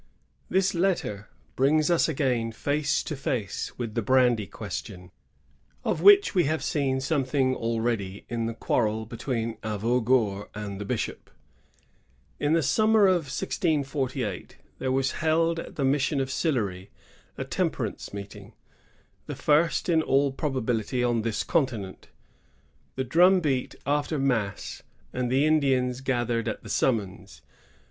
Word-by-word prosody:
^ - - -36 0.5
This 190 +1 +2
letter 170 - -1 0.3
brings 150 +4 +3
us 170 -1 +3
again 125 -6 0
face 145 +4 0
to 155 - -4
face 125 -6 -3
with 115 -3 -4
the 115 - 0
brandy 120 -3 +3
question, 90 +1 -7 0.7
of - - -1
which 405 0 +7
we 180 -5 +3
have 155 +2 -1
seen 135 -3 0
something 135 -2 +1
already 115 -4 -2
in 115 -1 -2
the 115 - -4
quarrel 110 -1 0
between 115 -1 -3
Avaugour 110 -1 0
and 105 -1 -5
the - - -4
bishop. - - -4 1.1
In 145 +1 +1
the 165 -1 +3
summer 215 - +4
of 175 -7 +2
1648 135 - -2 0.2
there 130 - -1
was 135 0 +1
held 165 +1 +2
at - - -8
the 140 - 0
mission 140 +1 +1
of 135 -1 -1
Sillery 105 - -1 0.5
a - - -2
temperance - - -3
meeting, 100 0 -9 0.4
— - - -37
the - - -5
first 155 +3 +2
in 165 -3 +3
all 140 -2 +2
probability 125 -4 -1
on 120 -2 +1
this 110 -1 -1
continent. 120 - -2 0.9
The 130 - -1
drum 180 +8 +5
beat 135 -6 -1
after 145 +2 0
mass, 115 -8 -1 0.3
and 125 -1 -2
the 135 +3 +3
Indians 135 -5 +2
gathered 120 -3 -1
at - - -4
the - - -10
summons. 110 -8 -1
130 Hz, 140 wpm, -26 LUFS, 115-150 Hz, 1.1 s, which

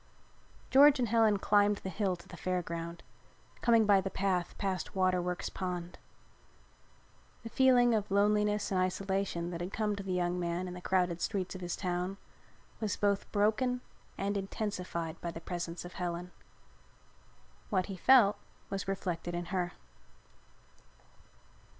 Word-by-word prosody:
George 285 +2 +8
and 245 -4 0
Helen 220 -2 +4
climbed 205 +1 +3
the 190 - -6
hill 190 0 0
to 170 - -16
the - - -10
Fair 180 -1 -1
Ground, 170 +1 -6 0.6
coming 230 -2 +5
by 200 -2 +5
the 195 - -3
path 185 -3 -1
past 190 -2 -3
Waterworks 180 -1 0
Pond. 180 -2 -5 1.4
The 230 - -6
feeling 245 -2 +5
of 210 -2 0
loneliness 210 +1 +2
and 185 -1 +2
isolation 185 -2 -1
that 170 -1 -5
had 180 +2 -4
come 210 -1 -1
to 200 - -5
the 195 -1 -5
young 180 0 0
man 175 +1 -2
in 180 - -6
the 180 - -8
crowded 180 -2 +1
streets 190 0 -2
of 185 - -8
his 175 -1 -3
town 180 +1 -2 0.6
was 215 -3 -2
both 200 -1 0
broken 220 +5 +1 0.4
and 200 +1 -1
intensified 185 -5 -4
by 170 - -3
the 165 - -6
presence 175 0 -5
of 175 - -9
Helen. 180 0 -4 1.4
What 185 -4 +1
he 195 - -6
felt 210 0 +5 0.3
was 195 -1 -3
reflected 175 -3 -3
in 175 0 -3
her. 180 -2 -1
190 Hz, 150 wpm, -32 LUFS, 175-205 Hz, 1.4 s, George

